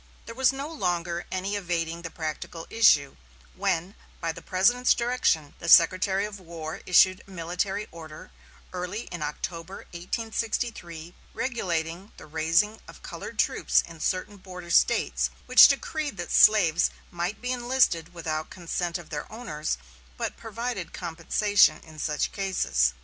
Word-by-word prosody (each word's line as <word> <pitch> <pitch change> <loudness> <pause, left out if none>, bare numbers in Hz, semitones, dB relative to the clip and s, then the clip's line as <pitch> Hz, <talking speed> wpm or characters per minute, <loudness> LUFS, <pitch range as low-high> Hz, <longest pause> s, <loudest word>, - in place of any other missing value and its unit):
There 230 - -8
was 260 +1 +3
no 275 +2 -5
longer 175 - -2
any 190 +2 -2
evading 170 -3 -2
the 170 - -6
practical 165 +1 -6
issue, 150 -11 +4 0.4
when, 170 - -1 0.3
by 165 - -1
the - - -10
President's 240 +7 +3
direction, 235 - 0
the 170 - -4
Secretary 185 +4 +5
of 210 -1 -8
War 165 -3 -7
issued 185 +1 +5
a - - -21
military 190 +3 -3
order, 160 -2 -11 0.4
early 180 +4 -4
in 175 - -6
October, 165 +4 -5
1863, 180 -3 -4 0.2
regulating 180 -6 -3
the - - -11
raising 165 +8 +1
of - - -14
colored - - -8
troops - - +2
in 165 -1 -12
certain 185 +5 -2
border 180 -2 -9
States, - - +3 0.2
which - - +9
decreed 310 -3 -2
that - - -5
slaves 175 -6 +5 0.2
might 175 +4 -3
be 250 +1 -3
enlisted 240 -9 +1
without 160 -3 -4
consent 175 -1 -3
of 170 -2 -13
their 150 +4 -5
owners, 215 -10 -3 0.4
but - - -3
provided 225 -5 -5
compensation 175 +1 +2
in 155 -1 -13
such 150 0 -1
cases. 70 - +1
180 Hz, 140 wpm, -26 LUFS, 165-210 Hz, 0.4 s, which